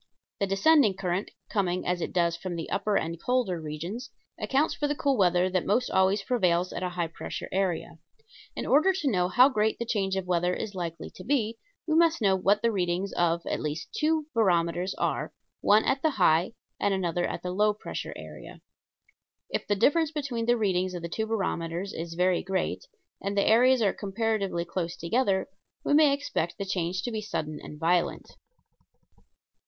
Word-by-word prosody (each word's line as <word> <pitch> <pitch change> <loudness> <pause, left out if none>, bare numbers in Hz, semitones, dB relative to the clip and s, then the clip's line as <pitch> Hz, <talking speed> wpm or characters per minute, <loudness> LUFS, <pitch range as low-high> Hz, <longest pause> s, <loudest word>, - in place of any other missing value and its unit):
The 200 - +1
descending 215 +2 +4
current 185 +1 -2 0.2
coming, 185 -3 -1
as 180 0 -1
it - - -3
does, 170 -2 +1
from 175 0 -5
the 165 - -5
upper 200 +1 +1
and 165 +1 -3
colder 240 -9 0
regions 170 - -6 0.3
accounts 280 +4 +1
for 295 - -1
the 295 - -1
cool 280 -1 +1
weather 180 -3 +3
that 185 -1 +1
most 240 +5 +1
always 190 +2 +3
prevails 180 -7 +1
at - - -4
a 180 - -1
high 175 -1 -2
pressure 165 - -6
area. 175 -3 -1 0.6
In - - -4
order 315 +8 +4
to 350 -6 -2
know 180 -3 +2
how 245 +8 +6
great 220 -5 +1
the 235 - -3
change 195 -4 0
of 190 -1 -2
weather 180 0 +1
is 210 - -5
likely 170 -3 -5
to 185 - -11
be, 230 -4 0 0.3
we 315 - 0
must 335 0 +4
know 195 -4 +3
what 200 +3 +2
the 230 - +3
readings 185 -1 -1
of 170 0 +1
at - - -2
least 150 +1 -4
two 310 0 +1
barometers 180 -4 +1
are - - -2 0.3
one 210 +2 +4
at 270 0 +1
the 315 - +3
high 180 - +2 0.3
and 200 -1 +1
another 175 -2 -1
at - - -5
the 180 - -3
low 210 +3 +3
pressure 210 - -6
area. - - -10 0.9
If - - -2
the 205 - +2
difference 310 +9 +3
between 270 -7 -3
the 240 0 +4
readings 185 -4 0
of 175 - -6
the 170 - -4
two 220 +5 -2
barometers 185 -3 -2
is 165 0 -6
very 180 0 +2
great, 190 - -2 0.3
and 200 +1 -3
the 200 - +3
areas 245 +2 +5
are 200 - +2
comparatively 200 -3 -1
close 170 -1 -4
together, 195 +2 0 0.4
we - - +2
may 300 -1 +6
expect 275 - -2
the 200 - -3
change 185 -1 -2
to 240 - -3
be 220 -1 -3
sudden 155 -7 -4
and 150 - -10
violent. 175 +2 0
195 Hz, 190 wpm, -27 LUFS, 175-230 Hz, 0.9 s, how